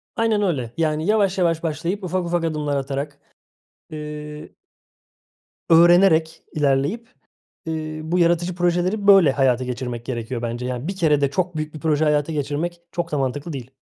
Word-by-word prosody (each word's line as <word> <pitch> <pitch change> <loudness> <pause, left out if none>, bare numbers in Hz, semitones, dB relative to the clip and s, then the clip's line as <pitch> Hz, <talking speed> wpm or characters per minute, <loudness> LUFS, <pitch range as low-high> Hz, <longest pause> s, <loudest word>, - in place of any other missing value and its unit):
Aynen 225 -3 +1
öyle. 135 - -1
Yani, 155 -1 0
yavaş 205 -2 +2
yavaş 170 -3 +1
başlayıp 170 +5 -3
ufak 185 0 -1
ufak 170 0 -1
adımlar 150 -3 -1
atarak, 140 +1 -4 0.7
eee 150 0 -7 1.2
öğrenerek 165 -1 +5
ilerleyip, 150 - 0 0.6
eee, 155 -1 -4
bu 165 +3 -1
yaratıcı 175 +1 +2
projeleri 180 +4 0
böyle 195 -8 +7
hayata 130 -2 +2
geçirmek 125 -1 -5
gerekiyor 120 -1 -4
bence. 120 +1 -3
Yani, 125 +4 -4
bir 195 - -4
kerede 150 -6 +2
çok 180 +1 -2
büyük 155 0 -4
bir 155 - -8
proje 155 0 +1
hayata 150 +1 +1
geçirmek 155 +4 -3
çok 170 -1 -3
da 150 - 0
mantıklı 140 +5 -2
değil. 130 -3 -7
155 Hz, 150 wpm, -22 LUFS, 140-175 Hz, 1.2 s, böyle